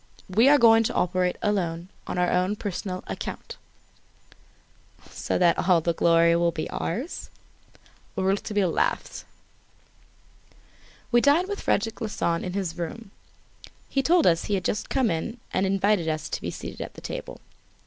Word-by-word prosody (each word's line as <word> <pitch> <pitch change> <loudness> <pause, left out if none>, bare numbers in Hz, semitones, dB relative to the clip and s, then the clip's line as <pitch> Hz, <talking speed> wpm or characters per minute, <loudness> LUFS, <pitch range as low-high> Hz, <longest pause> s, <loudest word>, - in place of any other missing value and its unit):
We 225 +8 +4
are 290 - +7
going 225 -3 +6
to - - -2
operate 180 0 +1
alone, 180 -4 -1 0.2
on - - -4
our 180 0 +2
own 185 +3 +1
personal 190 -2 -5
account." - - -6 1.5
"So - - -2
that 175 -2 +3
all 180 -2 +6
the 170 +1 0
glory 170 0 +4
will 170 0 +2
be 160 -2 -4
ours?" 245 - -4 0.9
Rouletabille 195 0 0
laughed. - - -1 1.9
We 240 0 +5
dined 300 +7 +4
with 405 0 -4
Frederic 225 0 -1
Larsan 170 -6 -1
in 180 - -4
his 185 -4 -3
room. 195 +5 -6 0.8
He 275 - +1
told 335 +3 +3
us 165 -1 +3
he 205 - 0
had 185 - -3
just 210 - -2
come 260 -5 +1
in 170 +9 -3 0.2
and 190 - +1
invited 195 -2 +1
us 155 0 -2
to - - -4
be - - -3
seated - - -7
at - - -7
table. - - -6
190 Hz, 150 wpm, -25 LUFS, 170-225 Hz, 1.9 s, are